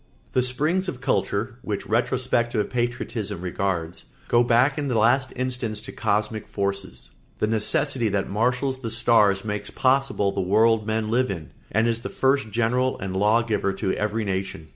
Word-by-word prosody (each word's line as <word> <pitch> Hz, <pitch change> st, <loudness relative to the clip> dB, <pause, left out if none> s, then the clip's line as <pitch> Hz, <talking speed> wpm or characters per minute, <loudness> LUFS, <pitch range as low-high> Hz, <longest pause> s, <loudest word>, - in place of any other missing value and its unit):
] -, -, -34 dB
The 130 Hz, -, +3 dB
springs 150 Hz, +9 st, 0 dB
of 130 Hz, -, -6 dB
culture, 120 Hz, -2 st, -1 dB
which 105 Hz, -2 st, -4 dB
retrospective 120 Hz, -3 st, 0 dB
patriotism 120 Hz, -5 st, -2 dB
regards, 90 Hz, -1 st, -2 dB, 0.2 s
go 120 Hz, 0 st, +5 dB
back 125 Hz, +5 st, +3 dB
in 145 Hz, -, -2 dB
the 125 Hz, -4 st, 0 dB
last 125 Hz, +4 st, +3 dB
instance 125 Hz, -4 st, -2 dB
to 115 Hz, -, -8 dB
cosmic 110 Hz, 0 st, -1 dB
forces. 100 Hz, -1 st, -4 dB, 0.3 s
The -, -, +1 dB
necessity 115 Hz, +3 st, 0 dB
that 100 Hz, -1 st, -1 dB
marshals 125 Hz, +5 st, 0 dB
the 115 Hz, -3 st, -4 dB
stars 110 Hz, -3 st, +3 dB
makes 105 Hz, -1 st, -3 dB
possible 130 Hz, -6 st, +1 dB
the 100 Hz, -, -2 dB
world 110 Hz, +3 st, +3 dB
men 110 Hz, 0 st, -1 dB
live 130 Hz, +2 st, +2 dB
in, 85 Hz, -6 st, -6 dB, 0.2 s
and 110 Hz, +2 st, +2 dB
is 115 Hz, -1 st, 0 dB
the 130 Hz, +2 st, -6 dB
first 135 Hz, -3 st, +1 dB
general 120 Hz, +4 st, +1 dB
and 95 Hz, -1 st, -4 dB
law 105 Hz, +4 st, +3 dB
giver 105 Hz, -3 st, 0 dB
to 95 Hz, 0 st, -1 dB
every 105 Hz, +1 st, -1 dB
nation. 95 Hz, -4 st, -4 dB
110 Hz, 170 wpm, -24 LUFS, 100-125 Hz, 0.3 s, go